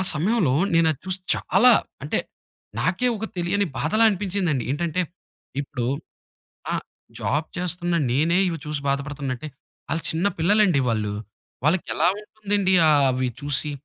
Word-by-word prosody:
సమయంలో 175 - +2 0.2
నేనది 160 -4 +3
చూసి 185 0 -2 0.2
చాలా 245 +6 +4 0.3
అంటే - - 0 0.6
నాకే 250 - +1
ఒక 220 - -5
తెలియని 185 +4 +1
బాధలా 215 +10 +2
అనిపించిందండి. 185 - -1
ఏంటంటే, 170 +3 -1 0.6
ఇప్పుడు 125 -4 -4 0.9
ఆ! - - 0 0.5
జాబ్ 150 +3 -1
చేస్తున్న 175 -1 -1 0.2
నేనే 160 +7 +2
ఇవి 170 -2 -2
చూసి 150 -1 -3
బాధపడుతున్న 140 0 -2
అంటే, 155 - -7 0.4
ఆళ్లు 160 +2 -1
చిన్న 165 +5 +1
పిల్లలండి 190 -2 +4
వాళ్ళు. 105 -2 -1 0.5
వాళ్ళకెలా 165 0 +2
ఉంటుందండి 205 -3 -1
ఆహ్, 145 -2 +5
ఆవి 130 0 0
చూసి? 145 +1 +2
165 Hz, 125 wpm, -24 LUFS, 145-190 Hz, 0.9 s, ఆహ్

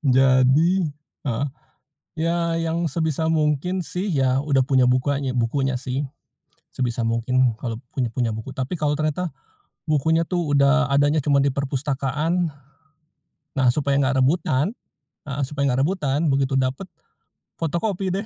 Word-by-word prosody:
Jadi 135 +8 +4 0.4
heeh, 130 +1 -1 0.7
ya 170 +1 +1 0.2
yang 165 +1 -1
sebisa 160 0 0
mungkin 155 +4 +1
sih 180 +3 -3
ya 135 -2 +1
udah 145 -3 +2
punya 130 -2 +4
bukanya 130 +2 +1
bukunya 125 +1 0
sih. 130 +2 -3 0.7
Sebisa 120 -2 -1
mungkin 120 +1 +1
kalau 115 -1 -5 0.2
punya 125 -4 -1
punya 120 -1 0
buku, 110 - -7
tapi 130 +7 -3
kalau 150 -2 0
ternyata, 155 +2 -1 0.6
bukunya 160 +2 +2
tuh 175 -5 -1
udah 140 +1 +3
adanya 145 +2 +3
cuma 140 -2 +3
di 140 - +3
perpustakaan. 140 +4 -1 1.0
Nah, 130 -1 +2
supaya 140 0 0
gak 135 -1 +2
rebutan 145 - +1 0.5
heeh, 140 +1 -3
supaya 140 0 -1
gak 135 - +2
rebutan, 150 -3 0
begitu 135 0 +1
dapet, 130 +7 -1 0.8
fotokopi 185 +4 -1
deh. 195 +4 -2
140 Hz, 135 wpm, -23 LUFS, 130-160 Hz, 1.0 s, Jadi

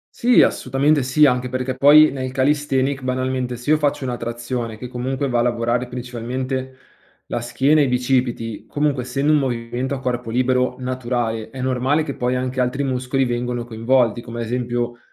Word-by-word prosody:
Sì, 245 +1 +5
assolutamente 140 +3 +2
sì, 130 +4 +3
anche 125 -2 +2
perché 130 +1 -2
poi 145 +4 +7
nel 130 -1 -4
calisthenics 135 0 +1
banalmente, 130 -1 -2
se 125 +5 -4
io 155 - +5
faccio 145 -2 0
una 125 -2 -3
trazione, 120 -1 -4
che 125 - -7
comunque 130 +3 -2
va 120 -3 0
a - - +3
lavorare 120 +1 0
principalmente 125 +2 -4 0.5
la - - -2
schiena 135 +6 +2
e - - +5
i - - 0
bicipiti, 125 -3 -1
comunque 145 -3 0
essendo 135 +4 0
un 150 - +5
movimento 125 0 -2
a 135 - -5
corpo 125 -2 -3
libero 125 +2 +1
naturale, 120 -3 -2
è 130 +3 -8
normale 130 +4 +1
che 145 -3 -5
poi 125 +1 -1
anche 130 0 -2
altri 125 +3 0
muscoli 130 0 0
vengono 120 0 -2
coinvolti, 120 0 +1
come 120 0 -7
ad - - -2
esempio 120 0 -2
125 Hz, 180 wpm, -21 LUFS, 120-135 Hz, 0.5 s, poi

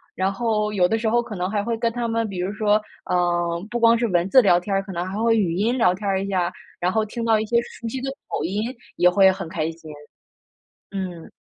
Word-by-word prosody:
然 190 +1 0
后 210 0 0
有 180 -3 +3
的 225 - +1
时 220 0 0
候 240 +1 +3
可 215 -3 -7
能 180 +1 -2
还 205 -1 -1
会 230 +2 -1
跟 230 0 0
他 240 0 -2
们， 230 0 0
比 190 - -6
如 185 +3 -2
说， 210 0 +2 0.3
呃， 175 -1 0
不 240 - -2
光 230 0 +5
是 235 - 0
文 180 -2 +1
字 260 - +7
聊 175 -4 +5
天 195 +2 -4
儿， 195 - +2
可 195 -1 -8
能 175 0 -2
还 190 +2 -5
会 230 -1 +3
语 175 -5 +1
音 220 +7 +1
聊 180 -7 +4
天 200 +2 -5
儿 195 0 +1
一 - - -4
下， 180 -3 0 0.3
然 180 +1 +1
后 220 - +2
听 230 +2 -5
到 225 -1 +4
一 215 - -2
些 235 - +2
熟 235 -1 -9
悉 260 +3 -4
的 270 - -3 0.2
口 - - -2
音 200 +5 -1 0.3
也 180 +1 +5
会 190 +1 +5
很 190 -3 -6
开 155 0 -2
心。 160 -1 -12 1.0
嗯。 185 -4 -5
200 Hz, 280 characters per minute, -23 LUFS, 180-225 Hz, 1.0 s, 字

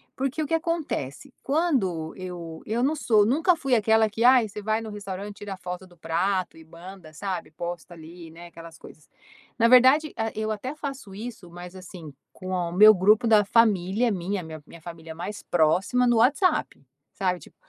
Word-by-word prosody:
porque 275 +4 -2
o 300 - -2
que 325 - -4
acontece? 310 - -4
Quando 250 - 0
eu 175 -3 -8
eu 225 +3 -2
não 300 +4 +1
sou 220 -7 +3
nunca 325 - +2
fui 275 -5 0
aquela 220 0 +3
que 225 +3 -3
ai 250 -2 +6
você 210 +1 -8
vai 220 +1 0
no 220 - -7
restaurante 205 0 -7
tira 200 -3 -7
foto 180 +1 -7
do 175 -1 -20
prato 175 +2 -2
e 160 - -15
manda 170 0 -13
sabe, 185 -2 -5
posta 175 +1 -7
ali, 165 0 -12
né, 170 +1 -12
aquelas 165 -1 -13
coisas. 155 - -15 0.5
Na 230 -1 +4
verdade, 260 +5 +5
ah, 225 0 -2
eu 215 0 -2
até 255 +7 -5
faço 275 -9 -7
isso 210 -5 -9
mas 175 +1 -10
assim, 180 -4 -10 0.2
com 185 - -11
o 180 -2 -2
meu 210 +3 +7
grupo 210 +5 +3
da 210 -2 +5
família 215 +1 +2
minha, 190 0 -3
minha 160 -1 -9
minha 165 +1 -14
família 165 -1 -9
mais 190 +5 -7
próxima 180 +10 +2
no 240 - +3
WhatsApp, 290 - +1 0.3
sabe 185 -2 -1
tipo: - - -17
200 Hz, 185 wpm, -25 LUFS, 175-235 Hz, 0.5 s, meu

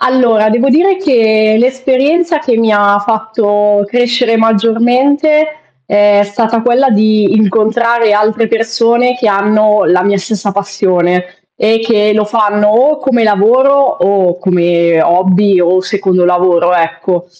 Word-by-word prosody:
Allora, 235 -4 +1
devo 240 +5 0
dire 360 +8 +2
che, 220 - +1
l'esperienza 265 +7 0
che 260 -6 -2
mi 225 -1 0
ha 205 -1 +2
fatto 210 -2 -1
crescere 245 +1 -1
maggiormente, 245 +8 +1 0.4
è 205 +4 +2
stata 225 +2 -2
quella 250 +3 +1
di 215 -1 +1
incontrare 220 +2 0
altre 215 +2 0
persone 230 +2 -1
che 250 -3 -3
hanno 210 +1 +1
la 180 +1 +1
mia 200 0 0
stessa 200 0 -5
passione, 180 -3 -1 0.4
e 225 +1 +1
che 215 -2 0
lo 210 0 0
fanno 210 -1 0
o 265 +8 +1
come 250 -5 -1
lavoro, 225 +7 +2
o 195 -9 0
come 170 -2 0
hobby, 185 +2 +1
o 180 +2 +1
secondo 185 -2 -1
lavoro, 175 0 +1
ecco, 170 +1 -3
215 Hz, 130 wpm, -10 LUFS, 200-240 Hz, 0.4 s, dire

